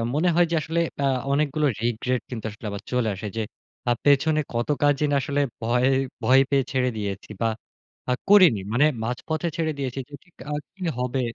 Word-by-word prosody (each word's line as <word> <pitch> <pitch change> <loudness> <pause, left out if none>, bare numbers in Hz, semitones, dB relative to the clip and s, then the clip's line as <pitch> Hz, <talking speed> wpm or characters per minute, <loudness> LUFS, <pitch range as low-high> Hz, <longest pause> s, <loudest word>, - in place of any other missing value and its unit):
মনে 175 +4 +3
হয় 175 0 +5
যে - - +2
আসলে 165 +2 -1 0.3
আ - - +3 0.3
অনেকগুলো 150 +1 +1
রিগ্রেট 120 +1 0
কিন্তু 110 -2 -5
আসলে 110 +1 -12
আবার 100 0 -5
চলে 125 -3 +1
আসে। 105 +3 -6
যে - - +1 0.5
আপ 120 - +2
পেছনে 150 +2 +4
কত 120 +4 -1
কাজই 145 0 +3
না - - +3
আসলে 145 +2 0 0.2
ভয় 125 +3 +2 0.4
ভয় 130 +3 +6
পেয়ে 135 -2 +3
ছেড়ে 130 -2 +1
দিয়েছি 100 -1 -4
বা 115 - +3 0.6
আ - - +4 0.2
করিনি। 185 - +7
মানে 140 +5 +4 0.2
মাঝপথে 155 +8 -2
ছেড়ে 160 -1 0
দিয়েছি 135 0 -3
যে - - -19
ঠিক 180 - -28 0.2
আ - - -1 0.2
কি 195 - -20 0.2
হবে? 125 +1 -1
135 Hz, 190 wpm, -24 LUFS, 120-150 Hz, 0.6 s, করিনি